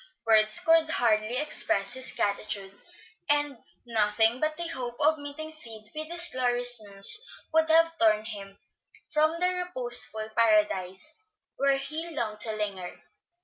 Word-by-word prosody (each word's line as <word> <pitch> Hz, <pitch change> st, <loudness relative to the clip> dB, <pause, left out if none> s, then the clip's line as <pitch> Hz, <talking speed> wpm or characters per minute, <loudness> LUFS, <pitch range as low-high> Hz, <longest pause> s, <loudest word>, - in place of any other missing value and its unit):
Words 215 Hz, -1 st, +4 dB
could 325 Hz, -1 st, +3 dB
hardly 230 Hz, -4 st, +2 dB
express 240 Hz, -7 st, 0 dB
his 260 Hz, 0 st, 0 dB
gratitude, 200 Hz, -1 st, -2 dB, 0.5 s
and 290 Hz, -3 st, 0 dB, 0.3 s
nothing 225 Hz, +1 st, +1 dB
but 310 Hz, +1 st, -2 dB
the 345 Hz, 0 st, -3 dB
hope 245 Hz, -5 st, -4 dB
of 305 Hz, +1 st, +2 dB
meeting 290 Hz, +2 st, -8 dB
Sid 225 Hz, -8 st, -7 dB
with 310 Hz, +1 st, -6 dB
this 345 Hz, 0 st, 0 dB
glorious 245 Hz, -2 st, +3 dB
news 200 Hz, -, -2 dB, 0.3 s
would 320 Hz, 0 st, +2 dB
have 330 Hz, +1 st, +4 dB
torn 215 Hz, -1 st, +3 dB
him 200 Hz, -3 st, -8 dB, 0.5 s
from 310 Hz, +1 st, +2 dB
the 360 Hz, +1 st, +2 dB
reposeful 240 Hz, -8 st, +1 dB
Paradise 210 Hz, -, +1 dB, 0.4 s
where 275 Hz, 0 st, +2 dB
he 305 Hz, +5 st, -4 dB
longed 215 Hz, -5 st, -3 dB
to 220 Hz, -, +1 dB
linger. 200 Hz, -4 st, -5 dB
245 Hz, 140 wpm, -27 LUFS, 215-310 Hz, 0.5 s, Words